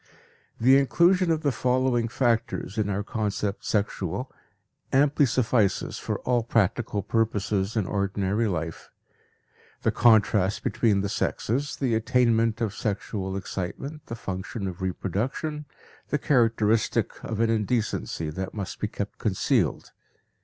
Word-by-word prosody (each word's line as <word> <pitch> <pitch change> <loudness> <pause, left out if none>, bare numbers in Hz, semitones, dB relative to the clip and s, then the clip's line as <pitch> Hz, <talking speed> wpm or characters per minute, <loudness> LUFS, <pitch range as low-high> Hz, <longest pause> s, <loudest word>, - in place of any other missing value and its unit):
The 130 +4 +6
inclusion 175 +6 +3
of 160 -1 +1
the 145 - +2
following 125 -2 +1
factors 115 -5 0
in 105 -1 0
our 100 +1 -1
concept 105 -1 -2
"sexual" 105 +3 -2 0.6
amply 145 +1 +4
suffices 115 -5 +1
for - - -2
all 125 -1 +1
practical 110 -2 0
purposes 105 -2 0
in 105 - +1
ordinary 100 +2 0
life: 80 -4 -4 0.9
the - - +3
contrast 105 -4 +3
between 105 -4 +2
the 100 - -1
sexes, 130 +7 -1
the 130 -4 0
attainment 115 0 +2
of 110 -3 0
sexual 100 -2 -3
excitement, 135 - -5
the 115 - -5
function 95 0 -5
of 90 0 -6
reproduction, 115 - -2 0.4
the 150 - +1
characteristic 115 -6 +1
of 110 -2 -4
an 115 0 +3
indecency 110 -8 -1
that 95 +6 -5
must 100 -3 -5
be - - -1
kept - - -6
concealed. - - 0
110 Hz, 125 wpm, -26 LUFS, 100-125 Hz, 0.9 s, The